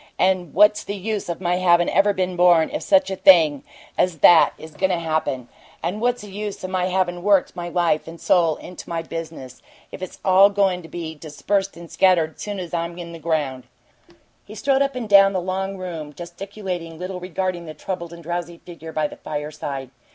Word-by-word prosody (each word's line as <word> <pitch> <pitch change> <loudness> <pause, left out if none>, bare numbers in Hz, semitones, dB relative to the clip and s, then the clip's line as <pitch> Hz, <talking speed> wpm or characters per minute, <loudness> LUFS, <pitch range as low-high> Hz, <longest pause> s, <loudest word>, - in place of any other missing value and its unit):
And 185 -4 +1
what's 210 +2 +5
the 200 - -5
use 205 0 -4
of 170 - -3
my 180 -1 0
havin' 175 -1 +4
ever 200 +2 +3
been 185 -2 -2
born, 175 -2 +4
if - - -2
such 195 -1 +3
a - - -1
thing 160 -7 +5 0.4
as 180 -3 +2
that 170 -2 +7
is 160 - -11
goin' 190 +5 0
to 180 - +1
happen? 155 -6 -2 0.4
What's 215 +7 -1
the 205 - -10
use 205 0 -6
of 185 - -5
my 185 -1 0
havin' 180 -1 -1
worked 200 -1 +2
my 175 -1 -5
life 170 -3 0
and 165 0 -9
soul 165 -4 +3
into 180 +3 -11
my 165 -1 -3
business, 160 -6 -8 0.3
if - - -9
it's 185 - -7
all 190 +1 +6
goin' 195 -3 +1
to 165 - -12
be 165 -1 -6
dispersed 190 +6 -2
and 170 -1 -11
scattered 170 -4 +2
soon 205 -2 -5
as 175 -2 -7
I'm 170 0 -3
in 170 -1 -7
the 165 - -9
ground?" 150 -6 -2 0.8
He 210 - -12
strode 270 +5 +1
up 275 -1 0
and 245 -3 -4
down 195 -1 +6
the 185 - 0
long 190 +2 -3
room, 165 -5 -6
gesticulating 175 -1 -7
little 180 +1 -5
regarding 180 -1 -3
the 155 - -8
troubled 170 +1 -5
and 170 0 -11
drowsy 175 0 -4
figure 165 -2 -11
by 155 -1 -1
the - - -12
fireside. 145 -3 -5
175 Hz, 205 wpm, -22 LUFS, 165-190 Hz, 0.8 s, that